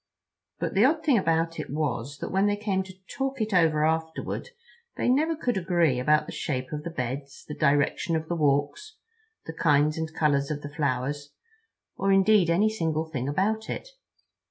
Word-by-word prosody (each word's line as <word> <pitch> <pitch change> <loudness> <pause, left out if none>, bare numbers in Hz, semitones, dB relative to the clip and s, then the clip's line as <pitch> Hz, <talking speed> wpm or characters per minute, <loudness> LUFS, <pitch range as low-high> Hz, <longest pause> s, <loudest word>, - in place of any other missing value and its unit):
But - - -2
the 200 +2 +4
odd 310 +5 +3
thing 270 -8 +4
about 165 -1 0
it 155 - -5
was 145 -2 -2
that - - -4
when 195 +2 +2
they 205 - +2
came 200 -2 -1
to 190 - -11
talk 270 -1 -3
it 220 -1 -1
over 160 -4 +3
afterward 160 - -2 0.5
they - - 0
never 305 +6 +2
could 245 -8 -1
agree 170 -7 +2
about 150 +4 +3
the - - -8
shape 130 -3 -3
of 150 -1 -4
the 170 - -5
beds, 135 -1 -5
the 150 - -5
direction 145 +4 +1
of 160 0 -2
the 175 - -2
walks, 150 - 0 0.5
the 160 - -6
kinds 150 0 +2
and 160 0 -3
colors 145 -3 +1
of 145 -1 -4
the 145 0 -7
flowers, 145 0 -2 0.6
or 195 0 +1
indeed 195 -2 +4
any 185 +6 +3
single 160 -7 -1
thing 130 -2 -2
about 215 +8 -1
it. - - -5
160 Hz, 185 wpm, -26 LUFS, 145-195 Hz, 0.6 s, the